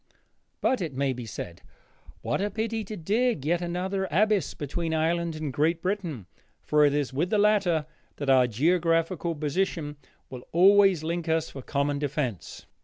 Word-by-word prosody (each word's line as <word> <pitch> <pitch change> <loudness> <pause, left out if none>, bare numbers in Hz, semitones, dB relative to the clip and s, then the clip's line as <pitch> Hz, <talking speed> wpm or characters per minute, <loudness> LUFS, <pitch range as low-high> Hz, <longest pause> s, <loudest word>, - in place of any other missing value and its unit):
But, 255 -5 +1
it 155 -7 -4
may 135 0 0
be 120 -2 -7
said, 90 -4 -7 0.6
what - - -1
a 205 - 0
pity 220 +2 -2
to 210 +2 -7
dig 205 - 0
yet 170 +3 +1
another 185 +3 -2
abyss 210 +3 +1
between 160 +3 -3
Ireland 165 +1 0
and 155 -3 -4
Great 160 +4 +1
Britain, 175 - -3 0.4
for 150 0 +3
it 145 - +3
is 145 -3 -1
with 160 +7 0
the 215 - +2
latter 200 -7 +3 0.3
that 145 - -5
our 130 -2 +5
geographical 165 - +1
position 150 0 -2 0.3
will 125 -2 -8
always 195 -1 +5
link 170 +1 -3
us 160 0 0
for 135 - -8
common 140 +2 -1
defense. 140 - -3
165 Hz, 165 wpm, -27 LUFS, 145-190 Hz, 0.6 s, our